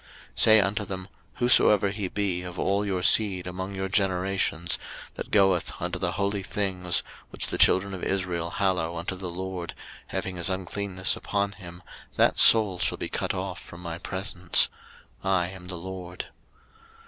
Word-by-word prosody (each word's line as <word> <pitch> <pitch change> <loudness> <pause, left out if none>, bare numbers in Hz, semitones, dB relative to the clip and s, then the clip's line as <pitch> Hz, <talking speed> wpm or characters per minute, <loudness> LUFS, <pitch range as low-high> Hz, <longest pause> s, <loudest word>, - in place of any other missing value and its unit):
03:022:003 - - -6
Say 110 0 +7
unto 100 +2 0
them, 95 -1 -6 0.3
Whosoever 105 -5 +5
he 100 -2 -3
be 95 -2 -2
of 90 0 -8
all 100 +3 0
your 95 -3 -2
seed 95 -3 +4
among 95 +2 -5
your 95 0 -2
generations, 95 -3 0 0.3
that - - -7
goeth 95 -4 +2
unto - - -3
the - - -1
holy 100 0 -1
things, 95 -3 -1 0.3
which - - -2
the - - -3
children 100 +1 +5
of 95 - -7
Israel 90 -3 -1
hallow 90 -3 -1
unto 85 +3 -3
the 90 -1 -5
LORD, 90 0 -5 0.3
having 95 -1 -4
his 85 +1 +2
uncleanness 95 +1 -1
upon 100 -1 -2
him, 90 -2 -12 0.3
that - - +3
soul 105 -5 +6
shall - - +1
be - - -4
cut - - -2
off - - -5
from 85 - -12
my 85 -1 -5
presence: 95 -1 0 0.5
I 95 -2 +1
am 95 -1 -11
the 90 - -6
LORD. 90 0 -7
95 Hz, 165 wpm, -26 LUFS, 90-100 Hz, 0.5 s, Say